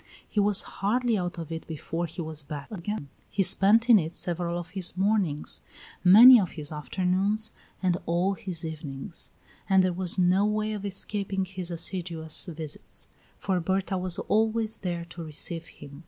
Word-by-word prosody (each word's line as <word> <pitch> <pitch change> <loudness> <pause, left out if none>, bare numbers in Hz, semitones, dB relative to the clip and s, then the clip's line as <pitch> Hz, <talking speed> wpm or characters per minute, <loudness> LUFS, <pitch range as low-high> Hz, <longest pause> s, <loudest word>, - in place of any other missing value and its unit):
He 210 - -1
was 205 -1 +4
hardly 235 +4 0
out 180 -2 -3
of 165 -1 -6
it 165 0 -6
before 165 +2 -4
he 165 +2 -6
was 155 -1 -2
back 145 +2 -8
again. 200 -5 -5 0.2
He 200 - +1
spent 215 +5 +5
in 230 -4 +8
it 165 0 -4
several 175 0 -2
of 175 -1 -7
his 185 -2 -1
mornings, 190 -7 +1 0.4
many 230 +7 +10
of 185 -5 -2
his 150 -2 -5
afternoons, 190 +7 0 0.3
and 180 -2 +2
all 175 +4 +1
his 180 -3 -5
evenings; 155 -1 -6 0.4
and 190 -1 +5
there 185 -1 +1
was 180 +1 -2
no 185 +2 +3
way 215 +1 0
of 205 -1 -5
escaping 195 -1 -1
his 185 -1 -4
assiduous 170 -1 -2
visits, 160 -3 -6 0.3
for 190 -2 -1
Berta 190 +2 -1
was 180 -1 -2
always 220 +1 0
there 175 -2 -3
to 170 0 -9
receive 165 +2 -4
him. 140 0 -12
180 Hz, 170 wpm, -27 LUFS, 165-200 Hz, 0.4 s, many